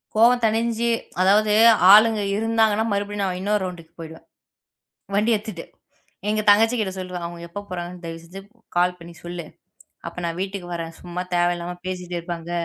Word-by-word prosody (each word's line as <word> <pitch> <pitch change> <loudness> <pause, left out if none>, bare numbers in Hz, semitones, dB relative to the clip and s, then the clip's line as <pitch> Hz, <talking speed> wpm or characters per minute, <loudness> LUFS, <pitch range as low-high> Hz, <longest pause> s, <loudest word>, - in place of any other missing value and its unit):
கோபம் 240 +3 +5
தணிந்து 230 +1 0 0.3
அதாவது 210 +3 +4 0.4
ஆளுங்க 215 +1 +7
இருந்தாங்க 225 0 +2
என்றால், 220 +1 -1
மறுபடியும் 205 0 -2
நான் 185 -2 -2
இன்னொரு 205 +1 0
ரவுண்டுக்கு 175 -3 -7
போய்விடுவேன். 160 0 -10 0.9
வண்டி 215 +3 +2
எடுத்துவிட்டு. 210 -5 -6 0.6
எங்க 215 0 +1
தங்கச்சி 225 +4 +5
கிட்ட 200 -3 -1
சொல்லுவேன். 180 -2 -5
அவங்க 170 0 -10
எப்ப 205 +4 -7
போறாங்க. 175 -1 -5
தயவு 165 0 -7
செய்து 180 +4 -10 0.4
கால் 180 0 +2
பண்ணி 170 0 -12
சொல்லு. 175 -1 -6 0.6
அப்போ - - -8
நான் 170 +1 -4
வீட்டுக்கு 190 -2 -6
வரேன். 165 -1 -5
சும்மா 180 0 -5
தேவையில்லாமல் 175 0 -1
பேசிக்கொண்டு 180 -1 -4
இருப்பாங்க. 170 -1 -6
185 Hz, 155 wpm, -23 LUFS, 175-215 Hz, 0.9 s, ஆளுங்க